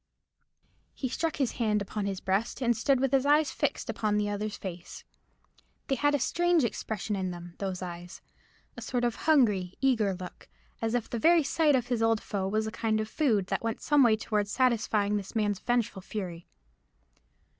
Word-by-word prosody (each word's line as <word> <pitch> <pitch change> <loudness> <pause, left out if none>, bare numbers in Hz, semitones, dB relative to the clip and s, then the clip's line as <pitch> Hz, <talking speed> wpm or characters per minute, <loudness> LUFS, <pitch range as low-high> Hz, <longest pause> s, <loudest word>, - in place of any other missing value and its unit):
He 265 - -2
struck 320 +5 -1
his 270 -5 0
hand 215 -3 0
upon 200 0 -3
his 195 -1 -3
breast, 195 +7 -1
and 240 -2 +2
stood 255 +4 +2
with 270 0 +1
his 270 -1 +3
eyes 295 0 +3
fixed - - -2
upon 210 -1 0
the 205 0 0
other's 205 0 -3
face. 175 -3 -8 0.9
They - - +2
had 290 +3 +2
a - - 0
strange 345 +4 +2
expression 220 -2 -2
in 190 -1 -2
them, 175 -1 -8
those 190 -2 -3
eyes—a 175 0 -11
sort 245 -1 -2
of 240 - +1
hungry, 210 - +2
eager 225 -8 +2
look, 180 0 -10 0.3
as 225 +1 0
if 240 -2 -1
the 235 - -4
very 330 +5 +5
sight 300 0 +3
of 250 -1 -1
his 240 -3 0
old 225 -1 +3
foe 195 -3 -3
was 215 +2 0
a 220 - -4
kind 220 -1 0
of 215 0 -3
food 225 -11 +1
that - - -1
went 225 -1 -2
some 295 -1 +3
way 235 -4 +6
towards 210 -2 -1
satisfying 215 -4 +1
this 195 +1 -7
man's 205 -3 0
vengeful 235 -5 -1
fury. 180 -4 -6
220 Hz, 190 wpm, -29 LUFS, 200-255 Hz, 0.9 s, way